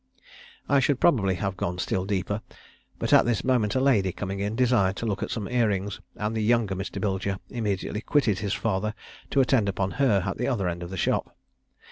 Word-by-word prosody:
I 140 0 +4
should 135 0 +1
probably 100 - +3
have 95 0 -2
gone 90 0 -3
still 90 +1 -1
deeper, 100 +1 -1 0.6
but - - -1
at - - +8
this 120 -3 0
moment 120 -5 +1
a - - +3
lady, 115 -9 +3
coming 95 +1 -5
in, 100 +2 -2
desired 115 -6 +3
to 115 - -4
look 100 -3 -2
at - - -2
some 105 -4 -3
ear 120 -2 +2
rings, 100 -1 -2
and 105 +1 -2
the 110 - 0
younger 110 -2 +2
Mr. 95 +1 -5
Bilger 95 -1 -1
immediately 105 -2 -2
quitted 115 -8 +1
his 105 0 -1
father 105 0 -1 0.3
to 140 - +3
attend 125 -6 +2
upon 95 0 -1
her 105 -9 +3
at 95 - -3
the 125 - 0
other 105 -9 0
end 85 0 -3
of 85 - -6
the 95 - -6
shop. - - -1
105 Hz, 210 wpm, -26 LUFS, 95-120 Hz, 0.6 s, at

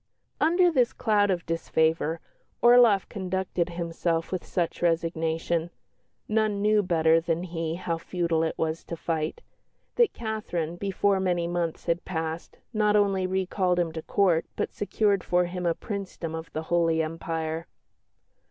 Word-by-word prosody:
Under 350 +3 +4
this 250 -6 +2
cloud 210 -3 +2
of 180 -3 -1
disfavour 160 -1 0 0.4
Orloff 240 -5 +6
conducted 190 -2 -2
himself 170 -1 -2
with 185 -2 -2
such 175 -2 -2
resignation 165 0 0 0.6
none 215 -1 +1
knew 210 +1 +3
better 165 -3 +3
than 165 +1 -1
he 165 -2 -3
how 170 -2 -3
futile 170 -2 -1
it 160 - -1
was 160 0 -2
to 170 - -6
fight 160 -1 -2 0.6
that 475 -2 +5
Catherine, 210 -8 -3
before 195 +1 +1
many 175 -2 0
months 170 -1 -2
had 170 0 0
passed, 160 -2 -4 0.2
not 210 -1 +2
only 195 -2 +2
recalled 185 -1 0
him 170 -2 +1
to 160 0 -5
Court, 175 -2 +2
but - - -2
secured 205 -2 +1
for 180 0 +2
him 180 0 -3
a 165 - +2
Princedom 195 -6 -5
of 160 0 -6
the 155 - -4
Holy 165 -1 +3
Empire. 160 0 -3
175 Hz, 145 wpm, -27 LUFS, 165-195 Hz, 0.6 s, Orloff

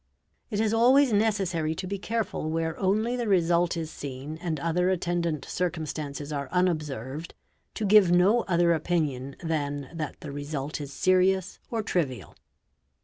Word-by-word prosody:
It 210 -3 -2
is 220 0 +2
always 250 +2 +5
necessary 190 -7 +1
to 185 - -5
be 195 +1 -4
careful, 220 -7 -2
where 160 0 -1
only 215 +5 +1
the 240 -2 -2
result 175 -2 +2
is 160 -1 -4
seen 140 +3 -7
and 165 -4 -2
other 170 +4 +1
attendant 170 -5 -1
circumstances 155 -4 -3
are 140 -2 -3
unobserved, 155 -5 -1 0.4
to 215 - -2
give 205 -2 +6
no 185 +7 +5
other 170 -2 +3
opinion 150 -5 -1
than 145 -4 -2
that 155 -3 -5
the 150 - -6
result 145 +1 -4
is 140 -1 -6
serious 185 +3 +2
or 225 -2 -2
trivial. 145 - -2
170 Hz, 145 wpm, -27 LUFS, 150-190 Hz, 0.4 s, give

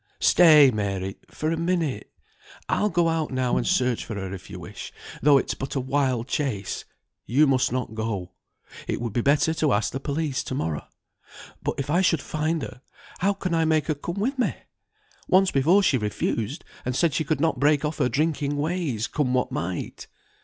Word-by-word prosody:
"Stay, 155 -6 +7
Mary, 100 -3 -2
for 155 +1 -2
a - - +1
minute; 170 -4 -1 0.6
I'll 210 - +1
go 175 -2 +2
out 165 -2 0
now 130 -1 0
and - - 0
search 125 -10 +1
for 110 - -6
her 95 -1 -5
if 95 -1 -9
you - - -7
wish, - - -8 0.3
though 145 +1 +6
it's - - 0
but 135 +2 -5
a - - +1
wild 130 -2 0
chase. 125 -10 -2 0.4
You 140 +6 +4
must 130 -3 +2
not 125 -3 -2
go. 110 -5 -3 0.6
It - - -2
would 120 -3 -4
be 120 - +1
better 145 +4 +3
to 155 -4 +1
ask 105 +2 +1
the 135 - -4
police 145 -1 -2
to 130 - -4
morrow. 80 - -3 0.7
But - - -2
if 140 +1 -3
I 175 +3 +3
should 170 -4 +3
find 155 0 -1
her, 125 -1 -8 0.4
how 195 +3 +2
can 185 -3 -3
I 165 -1 +3
make 155 -2 +2
her 155 - 0
come 170 +6 -5
with 260 +6 -1
me? 250 - +1 0.7
Once 190 0 +4
before 165 +9 +4
she 135 -8 +3
refused, 110 - -2 0.2
and 125 0 -2
said 165 0 +2
she - - 0
could 150 0 -1
not 160 +1 +1
break 145 +1 +3
off 150 +1 -3
her 125 -4 +2
drinking 145 -1 0
ways, 150 - -1
come 130 -3 0
what 125 - 0
might?" 90 0 -4
140 Hz, 195 wpm, -25 LUFS, 125-160 Hz, 0.7 s, Stay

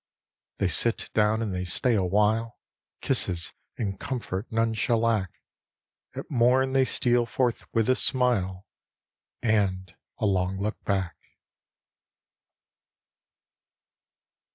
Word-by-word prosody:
They 100 - +1
sit 115 +5 0
down 110 +1 +2
and 105 -4 -3
they 90 0 -2
stay 95 +7 +1
awhile, 105 +4 +1 0.4
Kisses 85 -2 +1 0.2
and 100 -4 -3
comfort 115 -6 -4
none 115 0 +1
shall 110 +2 +1
lack; 110 -5 +1 0.9
At - - -5
mom 130 +1 +3
they 135 -1 +4
steal 120 -2 +2
forth 125 -1 -1
with 115 -1 +1
a 130 - +5
smile 115 -9 0 0.8
And 95 -6 0 0.2
a - - -1
long 95 -1 0
look 105 +2 -4
back. 95 -3 -1
110 Hz, 105 wpm, -26 LUFS, 95-120 Hz, 0.9 s, a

